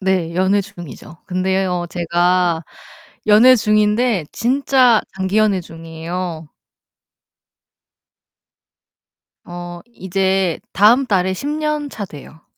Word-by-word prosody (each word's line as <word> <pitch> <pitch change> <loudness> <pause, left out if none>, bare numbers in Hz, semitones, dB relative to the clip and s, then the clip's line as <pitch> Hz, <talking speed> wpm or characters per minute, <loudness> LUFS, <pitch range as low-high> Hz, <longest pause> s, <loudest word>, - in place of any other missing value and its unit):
네 185 -3 -1
연애 190 +3 +2
중이죠. 170 -4 -11
근데요 185 -1 -1
제가 175 0 +1 0.6
연애 225 +5 +7
중인데 215 -2 +1
진짜 255 -1 +3 0.2
장기 190 +2 -1
연애 210 -3 +2
중이에요. 165 0 -7 3.0
어 175 0 -8
이제 190 -2 -1
다음 230 +7 +4
달에 190 -5 0
10 230 +10 -6
년차 300 -7 -3
돼요. 155 -1 -14
190 Hz, 175 characters per minute, -18 LUFS, 175-215 Hz, 3.0 s, 연애